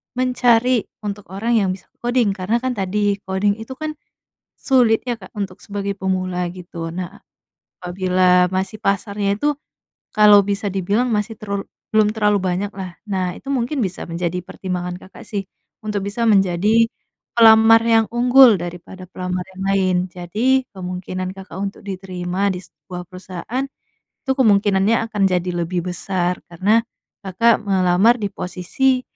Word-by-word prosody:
mencari 250 -1 +2 0.2
untuk 205 -1 -5
orang 225 +5 0
yang 190 -2 0
bisa 185 - -19
koding. 240 -3 +1
Karena 200 +5 -1
kan 255 - 0
tadi, 205 -1 0
koding 200 +2 0
itu 225 +4 -8
kan 310 +3 -4 0.7
sulit 245 -4 +3
ya, 240 - 0
Kak, 190 -4 -14
untuk 195 -3 -6
sebagai 200 -1 -4
pemula 185 -2 -1
gitu. 170 -2 -7
Nah, 185 +3 -7 0.6
apabila 180 0 +2
masih 195 +3 -3
pasarnya 200 +1 0
itu 295 +3 +1 0.6
kalau 210 -1 +7
bisa 200 +1 -2
dibilang 200 +5 0
masih 215 -1 -2
terlalu 200 -2 -3 0.3
belum 215 -1 +4
terlalu 210 -2 +2
banyaklah. 190 0 -3
Nah, 185 -3 -1
itu - - -19
mungkin 270 +1 -1
bisa 190 -6 -2
menjadi 170 +1 -3
pertimbangan 180 -1 -5
Kakak 190 - -13
sih 195 -3 -5 0.3
untuk 210 -2 -3
bisa 210 +4 -1
menjadi 200 +2 +4 0.6
pelamar 225 0 +8
yang 225 -1 +5
unggul 245 -3 +6
daripada 175 +2 -8
pelamar 180 0 -4
yang 190 - -6
lain. 195 -1 +2 0.2
Jadi, 230 +9 0
kemungkinan 185 0 -5
Kakak 190 -2 -11
untuk 195 +1 -4
diterima 185 0 -2
di 180 - -4
sebuah 180 +1 -10
perusahaan, 185 +7 -5 0.6
itu 270 - -5
kemungkinannya 205 -2 +3
akan 205 -2 -1
jadi 180 -1 0
lebih 175 +1 -2
besar 180 -1 -2
karena 190 +6 +2 0.5
Kakak 220 +5 +3
melamar 190 +4 +4
di 205 -4 -3
posisi 200 +10 0
195 Hz, 140 wpm, -20 LUFS, 185-220 Hz, 0.7 s, pelamar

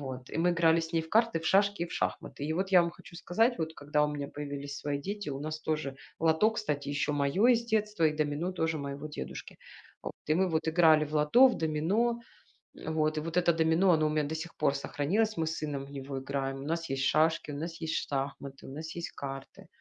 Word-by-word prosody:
Вот. 130 -2 -7
И - - -4
мы 175 +2 +3
играли 165 -1 +4
с 165 +1 -6
ней 165 - +1
в 160 - -12
карты, 230 -3 +3
в 160 - -11
шашки 200 -1 +3
и - - -1
в - - -10
шахматы. 145 - -3
И 155 - -1
вот 190 +4 -1
я 180 - +8
вам 170 - -1
хочу 170 0 -14
сказать, 225 +8 +1
вот 160 0 -3
когда 150 +1 0
у - - 0
меня 145 -1 -4
появились 140 -1 -6
свои 145 -1 -2
дети, 200 +3 -5
у 135 -1 -4
нас 155 +1 -4
тоже 150 -3 -2 0.2
лото, 165 +7 +3
кстати, 150 -11 -3
ещё 145 +1 0
моё 145 +10 +2
из 235 -1 +4
детства 210 -5 +1
и 150 - +2
домино 155 +4 -1
тоже 160 -3 -1
моего 140 +1 -5
дедушки. 150 - -7 0.5
Вот. - - -5 0.2
И - - +5
мы 185 +2 +2
вот 160 0 0
играли 160 -2 +5
в 150 - -10
лото, 150 - +6
в - - -2
домино. 180 +10 +1 0.7
Вот. 155 -1 0
И - - 0
вот 165 +2 -5
это 175 -1 +4
домино, 160 +4 +3
оно 155 -2 +4
у - - +2
меня 150 -1 0
до 160 - -3
сих 165 +2 -6
пор 145 -2 +2
сохранилось, 200 +11 0
мы 160 - 0
с 160 -1 -3
сыном 140 -2 -4
в - - -14
него 135 0 -6
играем. 135 0 -3
У 140 - -7
нас 165 +1 -2
есть 135 0 -1
шашки, 155 +2 +2
у 140 - -5
нас 165 +3 -5
есть 160 0 -2 0.2
шахматы, 140 0 -4
у 135 - -9
нас 160 +3 -7
есть 170 - -5
карты. 135 -1 -7
160 Hz, 240 wpm, -30 LUFS, 145-175 Hz, 0.7 s, я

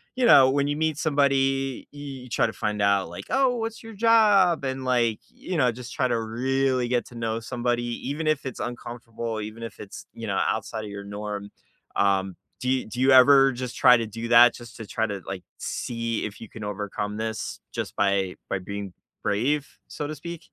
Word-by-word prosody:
you 255 - +2
know, 135 - +8
when 140 +1 +1
you 145 - 0
meet 155 -1 0
somebody, 135 -4 +1
y 145 - -11 0.3
you 125 - -13
try - - +2
to 110 - -4
find 105 -2 -2
out 100 -3 +2
like, 85 - -8
"Oh, 265 -2 +3
what's 225 0 -4
your 225 0 -9
job?" 205 -8 +4
And, 130 0 -3
like, 120 -4 +1
you 185 - -6
know, 125 -6 +3
just 125 +2 -9
try 130 -3 +1
to 120 - +1
really 130 +3 0
get 120 -1 +1
to 125 - -14
know 115 -1 -2
somebody 120 0 -1 0.3
even 155 +3 -3
if 155 -3 +1
it's 130 - -5
uncomfortable, 115 -2 -5
even 110 +2 -7
if 115 - -8
it's, 100 - -9
you - - -7
know, - - -1
outside 110 -1 -1
of 105 - -7
your 100 0 -7
norm. 100 0 -5 0.5
Um, 95 -2 +1 0.2
do 125 - -2
you 130 0 +1
do 120 +3 -7
you 130 +1 +4
ever 135 +1 +7
just 125 0 -5
try 125 0 +7
to 115 - -2
do 115 +2 -6
that 120 0 +8
just 120 -2 -11
to 115 - -7
try 110 - 0
to, 100 -2 -5
like, 95 -1 -5 0.2
see 115 -2 -3
if 110 +1 -8
you 115 - -9
can 110 - -9
overcome 105 0 -4
this 110 0 -4
just - - -4
by 100 -2 +1
by 100 - -1
being 100 0 -6 0.3
brave, 135 +8 0
so 145 - -5
to 155 - -5
speak? 170 +3 -7
120 Hz, 210 wpm, -25 LUFS, 105-135 Hz, 0.5 s, know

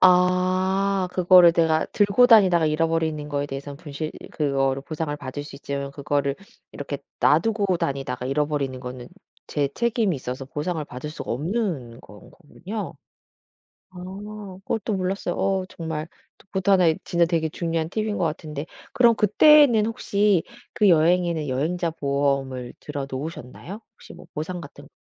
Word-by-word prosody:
아 185 +1 +3
그거를 180 -1 +7
내가 160 -1 +2
들고 205 +4 +3
다니다가 185 -8 +6
잃어버리는 160 -1 0
거에 145 -1 -2
대해서는 140 0 -7
분실 155 -1 -6 0.2
그거를 135 -2 0
보상을 155 0 -4
받을 145 0 -6
수 145 -1 -10
있지만 140 0 -4
그거를 140 0 -1 0.3
이렇게 140 0 -6 0.2
놔두고 200 +4 +3
다니다가 135 -6 -3
잃어버리는 140 -1 -1
거는 125 -1 -8 0.4
제 145 -2 0
책임이 230 -5 +1
있어서 130 -1 -5
보상을 150 +4 -3
받을 130 +2 -7
수가 155 - -5
없는 150 - -3
건 105 - -15
거군요. 190 +5 -7 1.0
아 185 - -17 0.7
그것도 220 0 -2
몰랐어요. 190 +1 -2
어 190 -1 0
정말 160 -1 -5 0.3
그것도 195 0 -1
1 185 -3 +5
의 160 - +2
진짜 170 -1 +2
되게 165 -2 0
중요한 165 0 -2
팁인 215 +1 -2
거 - - 0
같은데 150 -2 -4 0.3
그럼 235 -2 +5
그때는 235 +2 +6
혹시 205 -4 +1 0.3
그 210 - +3
여행에는 170 -2 +3
여행자 165 +7 -1
보험을 140 -4 -1
들어 145 -2 -5
놓으셨나요? 150 - -7
혹시 - - -14
뭐 - - -13
보상 170 +3 -5
같은 - - -12
거 - - -17
160 Hz, 330 characters per minute, -24 LUFS, 140-185 Hz, 1.0 s, 그거를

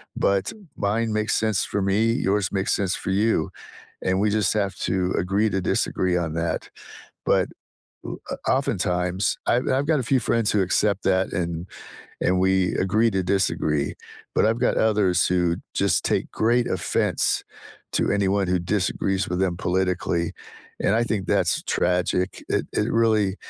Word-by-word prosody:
but 100 -1 +1 0.2
mine 110 +2 0
makes 105 0 0
sense 110 -3 +1
for 100 - 0
me, 100 +2 +1 0.3
yours 100 -1 +1
makes 95 -1 0
sense 95 -2 0
for 95 - -1
you, 100 -5 +1 0.6
and 95 0 +1
we 105 - +2
just 105 0 +1
have 100 -2 0
to 95 0 0
agree 100 +4 +1
to 95 0 -1
disagree 90 +1 0
on 80 - -4
that.” 85 0 -2 0.6
But - - +3 0.6
o - - -5
o - - -3 0.2
oftentimes, 90 +2 -1
I've 125 - +1
I've 140 +2 0
got 155 -3 +3
a - - -5
few 130 - +5
friends 115 -1 +1
who 105 - +2
accept 100 +2 +1
that 95 0 +2
and 85 -1 -3 0.6
and 90 +1 +2
we 95 -1 +2
agree 110 +4 +2
to 95 - 0
disagree, 80 -6 0 0.4
but - - +3
I've 115 +2 +1
got - - +1
others 100 -4 +2
who 90 -1 +1 0.2
just - - +1
take - - 0
great 120 +2 +2
offense 95 -1 0 0.5
to - - +1
anyone 100 -1 +1
who 90 - +2
disagrees 95 +1 -1
with 90 +1 -2
them 90 -3 0
politically, 90 -2 0 0.6
and 100 - +3
I 120 - +2
think 105 -5 -2
that's - - +1
tragic, 90 +1 +1 0.2
it - - 0
it 105 - 0
really 105 -4 +2
95 Hz, 165 wpm, -24 LUFS, 90-105 Hz, 0.6 s, few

